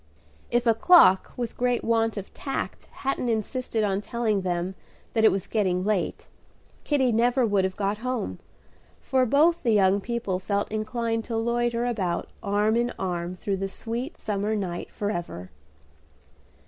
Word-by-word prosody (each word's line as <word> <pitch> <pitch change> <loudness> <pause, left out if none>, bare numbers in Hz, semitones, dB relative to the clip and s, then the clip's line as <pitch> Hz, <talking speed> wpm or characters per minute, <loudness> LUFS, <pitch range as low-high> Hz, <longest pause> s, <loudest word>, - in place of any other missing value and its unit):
If 240 +1 +1
a 230 - +5
clock 225 - +6
with 240 -2 -3
great 245 -1 0
want 225 -1 +1
of 200 - -7
tact 270 - -4
hadn't 265 -2 -2
insisted 225 +1 -1
on 200 -1 0
telling 215 -2 -1
them 180 0 -2 0.4
that 220 - +2
it 220 - +7
was 195 -2 -2
getting 185 -4 0
late, 205 -4 -1 0.6
Kitty 265 -4 +2
never 240 +3 +3
would 200 -3 +2
have 190 0 -3
got 205 +1 -1
home, 240 - -3 0.6
for 260 -1 +1
both 325 +7 +4
the 230 -3 +2
young 200 -1 +4
people 215 -4 -2
felt 200 +2 -1
inclined 225 +1 -1
to 230 - -2
loiter 235 +1 0
about 195 -8 -1
arm 210 +1 +1
in 240 +1 +1
arm 175 -1 -3
through 195 +1 -2
the 195 +1 -3
sweet 235 - -5
summer 210 +1 -1
night 180 -4 -4
forever. 175 - -4
220 Hz, 155 wpm, -26 LUFS, 195-240 Hz, 0.6 s, it